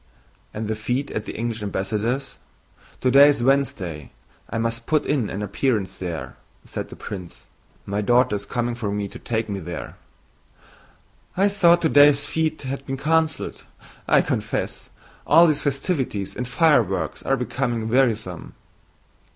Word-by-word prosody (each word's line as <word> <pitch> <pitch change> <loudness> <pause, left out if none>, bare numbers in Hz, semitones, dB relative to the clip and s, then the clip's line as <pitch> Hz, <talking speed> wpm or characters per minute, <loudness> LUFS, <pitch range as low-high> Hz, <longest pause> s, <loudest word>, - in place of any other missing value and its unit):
"And 110 0 -4
the 110 - -1
fete 120 +6 -2
at 110 - -3
the - - -6
English 115 -1 -3
ambassador's? 105 +6 -2 0.6
Today 135 +3 +7
is 140 -5 +1
Wednesday. 95 - 0 0.4
I 115 - -3
must 115 0 -2
put 155 -2 +2
in 130 -8 0
an 100 +2 -4
appearance 105 -3 -1
there," 85 -3 -5 0.3
said - - -6
the - - -10
prince. 90 -4 -8 0.4
"My 100 +1 -2
daughter 120 +1 +3
is 100 0 -6
coming 120 +1 -1
for 115 -4 -3
me 100 0 -2
to - - -11
take 115 -1 -2
me 100 -2 -3
there." 85 -1 -7 1.4
"I 195 +2 +4
thought 175 -4 +4
today's 145 -2 +6
fete 160 -2 -1
had 135 +1 -4
been 135 0 -3
canceled. 160 +2 0 0.4
I - - +5
confess - - -3 0.4
all 165 +3 +7
these 155 -3 +2
festivities 135 - -2
and 125 - -4
fireworks 120 - +2
are 135 - +1
becoming 120 -3 -2
wearisome." 110 -8 0
120 Hz, 145 wpm, -23 LUFS, 105-140 Hz, 1.4 s, Today